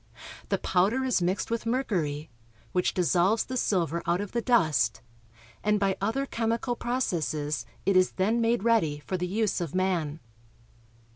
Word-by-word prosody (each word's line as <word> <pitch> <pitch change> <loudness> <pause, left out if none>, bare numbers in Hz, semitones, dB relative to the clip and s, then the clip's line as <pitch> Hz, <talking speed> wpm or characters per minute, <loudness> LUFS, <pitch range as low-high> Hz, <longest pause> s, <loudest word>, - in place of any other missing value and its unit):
The - - +2
powder 200 +8 +1
is 255 -7 +1
mixed 185 +5 -1
with 230 0 -2
mercury, 165 - -1 0.4
which 180 - 0
dissolves 185 +4 +3
the 260 - -5
silver 170 - 0
out 175 +1 +2
of 205 -1 -4
the 235 - -1
dust, 175 - +2 0.6
and 210 0 +2
by 195 -1 +1
other 225 +7 0
chemical 230 0 -1
processes 160 - -2 0.2
it 195 - +2
is 185 0 +4
then 215 +5 +1
made 230 -2 +1
ready 160 -11 +2
for 185 - -2
the 180 0 -2
use 210 0 0
of 170 -1 -4
man. 175 -5 0
190 Hz, 155 wpm, -28 LUFS, 175-230 Hz, 0.6 s, is